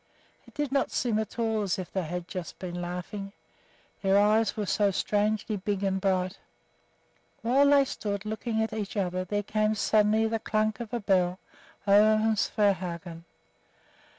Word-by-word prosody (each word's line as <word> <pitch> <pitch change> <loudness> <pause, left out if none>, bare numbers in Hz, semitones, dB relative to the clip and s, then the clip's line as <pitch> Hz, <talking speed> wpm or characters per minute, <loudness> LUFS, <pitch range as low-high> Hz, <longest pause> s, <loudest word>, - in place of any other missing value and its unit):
It - - -18
did 295 -2 -2
not 275 -1 +1
seem 230 -3 0
at 220 - -5
all 225 -2 0
as 195 -3 -1
if 185 -2 -7
they 190 - 0
had 175 +1 -5
just 180 -4 -6
been 175 -1 -5
laughing, 180 +3 -5 0.7
their 195 0 +3
eyes 215 +3 +3
were 210 - -1
so 205 +1 +2
strangely 210 +2 0
big 200 0 -2
and 190 -1 0
bright. 185 0 0 1.0
While 270 +5 +4
they 285 -1 +5
stood 205 -5 -4
looking 220 +1 -1
at 220 - -3
each 215 -1 -4
other 185 -1 -1
there 205 +3 -2
came 215 +1 0
suddenly 215 +1 +3
the 225 0 -1
"klunk" 215 +1 0
of 235 -2 -6
a 240 - -1
bell 185 -3 +1 0.5
over 210 +2 +6
from 220 0 +2
Svehaugen. 180 -5 -1
205 Hz, 165 wpm, -28 LUFS, 190-220 Hz, 1.0 s, over